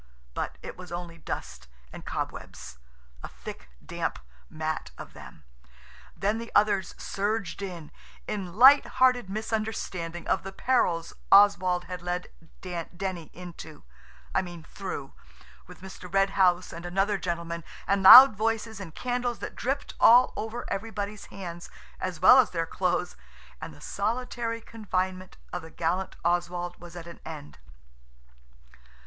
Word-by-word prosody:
But - - -4
it - - -7
was 180 -1 -11
only 170 -1 -6
dust 65 - -6 0.3
and - - -9
cobwebs–a - - -8
thick, - - -10 0.2
damp - - -3 0.3
mat 155 - -3
of - - -10
them. - - -13 0.7
Then 205 +3 0
the 230 - -8
others 205 -2 +2
surged 205 0 -2
in, 175 -6 -7 0.4
in 190 -4 -4
light 265 +6 +8
hearted 250 -5 +4
misunderstanding 205 -5 -3
of - - +1
the 195 - -7
perils 180 -7 0 0.2
Oswald 185 -3 +6
had 180 -1 -7
led 180 0 -3 0.3
Denny 175 0 -5
into–I 105 - -7
mean 175 -3 -9
through, 155 -7 -7 0.5
with - - -14
Mr. 190 -2 -10
Red 195 +1 +3
House 180 -2 +2
and 170 - -8
another 195 +3 0
gentleman, 170 -1 -4 0.2
and 200 0 +1
loud 250 +5 +11
voices 220 0 -1
and 170 -5 -9
candles 245 -1 -2
that - - -7
dripped 275 +3 -3
all 245 +2 +7
over 225 +2 -5
everybody's 210 0 -5
hands, 175 -3 -8 0.3
as 185 -3 -4
well 220 +9 +8
as 250 - +4
their 165 -2 -2
clothes, 180 +1 -1 0.5
and - - -6
the - - -15
solitary 230 +2 -2
confinement 185 -4 -3 0.2
of 180 - -3
the 160 - -11
gallant 175 +4 -2
Oswald 175 0 -1
was 175 0 -11
at 170 -1 -8
an 170 0 -11
end. 150 - -9
185 Hz, 135 wpm, -27 LUFS, 170-210 Hz, 0.7 s, loud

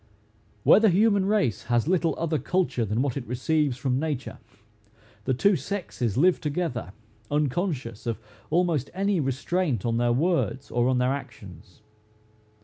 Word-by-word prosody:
Where - - +7
the 220 -1 +5
human 200 +1 +3
race 165 - +1
has 120 +3 +1
little 170 -2 +1
other 160 -2 -1
culture 175 -6 0
than 110 +5 0
what 140 -4 -1
it 130 -3 -5
receives 135 +2 0
from 130 0 0
nature, 145 -4 -4 0.9
the 130 - +1
two 200 +10 +3
sexes 140 - -3
live 175 +5 +3
together, 145 - -3 0.4
unconscious 145 - -2
of 115 - -1 0.3
almost 165 -5 +1
any 195 -1 +1
restraint 140 - -1
on 115 -1 0
their 120 0 +2
words 145 -1 0
or 120 0 +2
on 130 - +2
their 125 +1 +2
actions. 100 - -10
140 Hz, 145 wpm, -26 LUFS, 120-175 Hz, 0.9 s, Where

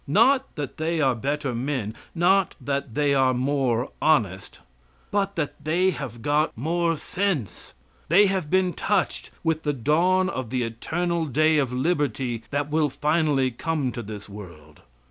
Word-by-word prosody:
Not 255 - +3
that 145 -4 -5
they 160 +1 -1
are 135 -4 +3
better 140 +2 -2
men, 120 -3 -2 0.2
not 185 +2 +3
that 140 -3 -3
they 145 -1 +2
are 130 -2 +3
more 130 -2 0
honest, 105 - +1 0.5
but 200 -1 0
that 155 -4 -4
they 180 +5 +2
have 120 - -7
got 150 -1 +1
more 165 +5 0
sense. 180 - -3 0.3
They 195 +6 +6
have 190 -6 -1
been 185 0 +2
touched 205 -3 -1
with 160 -1 0
the 150 -1 -1
dawn 170 +9 +2
of 130 - -4
the 125 0 -1
eternal 165 +9 -2
day 155 +3 +3
of 135 -4 0
liberty 130 -4 -1
that 145 +1 -2
will 155 -1 +2
finally 150 -2 +1
come 145 +1 -2
to 120 - -5
this 105 -2 -8
world. 85 -7 -12
145 Hz, 155 wpm, -25 LUFS, 125-170 Hz, 0.5 s, They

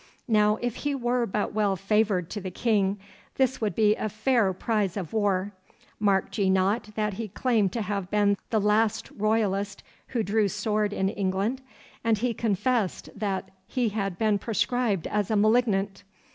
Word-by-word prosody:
Now, 210 -2 +3
if 245 -1 -2
he 290 -1 -1
were 245 -2 0
but 205 +2 -2
well 205 -2 +1
favoured 195 -2 +1
to 210 - -4
the 190 - -4
King, 200 0 +1 0.4
this 260 -2 +1
would 210 -5 -1
be 210 -1 +4 0.2
fair 215 -1 +2
prize 205 0 -1
of 185 -2 -5
war. 205 -2 0 0.5
Marked 200 0 +1
ye 195 -2 +3
not 195 +4 +1
that 210 -1 0
he 220 +3 -4
claimed 215 -2 +1
to 230 - -1
have 200 -2 -3
been 205 -1 +3
the 220 - +2
last 210 +1 +1
Royalist 205 -2 0 0.2
who 235 -4 -1
drew 210 +1 +2
sword 210 +2 0
in 190 -1 0
England? 200 +6 -1 0.4
and 225 -1 +2
he 240 +3 0
confessed 225 -1 0
that 195 -3 -3 0.2
he 245 -3 0
had 195 -3 -3
been 215 -1 +2
proscribed 225 -3 0
as 210 -2 -1
a 220 - +1
malignant. 205 -3 +2
210 Hz, 165 wpm, -26 LUFS, 195-225 Hz, 0.5 s, be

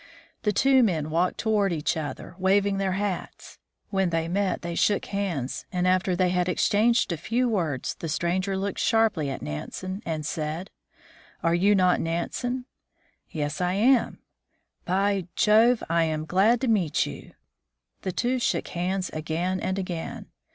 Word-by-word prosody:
The 210 - +1
two 265 +5 +4
men 160 -9 +1
walked 175 +3 +1
toward 210 -3 +1
each 155 -3 0
other, 155 +1 -5
waving 195 +1 +2
their 190 -1 0
hats. 195 -1 -4 0.3
When 190 -2 +1
they 165 -1 -1
met 190 +2 -1
they 170 0 -3
shook 205 +4 +1
hands, 180 -11 -3
and 180 -1 0
after 185 0 +2
they 180 0 +2
had 180 0 +1
exchanged 215 +5 +2
a 170 - -1
few 235 +10 0
words 165 - -1
the 165 - -6
stranger 185 +5 0
looked 195 0 -3
sharply 220 - +2
at 135 - -5
Nansen, 185 - -5
and 155 -2 -3
said, 155 +6 -4 0.3
" - - -26
Are 165 - +3
you 195 +4 +4
not 180 -2 +3
Nansen? 245 +10 -2 0.3
" - - -40 0.2
"Yes, 150 +2 -3
I 180 0 +1
am." 240 +6 +3 0.4
" - - -43 0.3
By 195 0 +1
Jove! 225 +3 +4
I 165 0 +2
am 155 -1 -2
glad 205 +8 +3
to 265 - 0
meet 190 -10 +2
you." - - -9 0.7
The 185 - -2
two 250 +7 0
shook - - -1
hands 185 +1 -2
again 165 +4 -2
and 190 +1 -2
again. 180 -4 -4
185 Hz, 165 wpm, -26 LUFS, 165-205 Hz, 0.7 s, two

